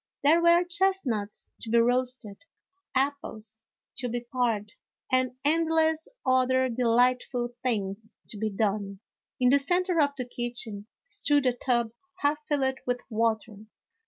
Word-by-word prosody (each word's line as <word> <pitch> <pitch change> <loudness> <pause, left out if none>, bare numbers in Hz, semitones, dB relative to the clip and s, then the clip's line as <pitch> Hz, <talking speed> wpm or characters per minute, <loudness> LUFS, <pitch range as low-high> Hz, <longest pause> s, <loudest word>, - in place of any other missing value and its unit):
There 320 +4 +5
were 340 +1 +5
chestnuts 345 - -1
to 225 - -7
be 235 - +3
roasted, 245 -3 +1 0.6
apples 260 -6 -2 0.4
to 250 -2 -2
be 240 +1 -2
pared, 230 -4 0 0.4
and 255 -1 +2
endless 320 0 +2 0.2
other 260 0 +3
delightful 245 +1 +1
things 220 -2 -3
to 215 - -6
be 220 0 0
done. 200 -1 -2 0.4
In 250 -1 +4
the 280 - +5
centre 355 +3 +1
of 285 -1 +1
the 250 - -3
kitchen 240 -4 -5 0.2
stood 290 - +2
a 250 - +3
tub 240 -2 0 0.3
half 295 +1 +2
filled 265 -2 0
with 245 0 0
water. 220 -1 0
250 Hz, 130 wpm, -27 LUFS, 225-285 Hz, 0.6 s, There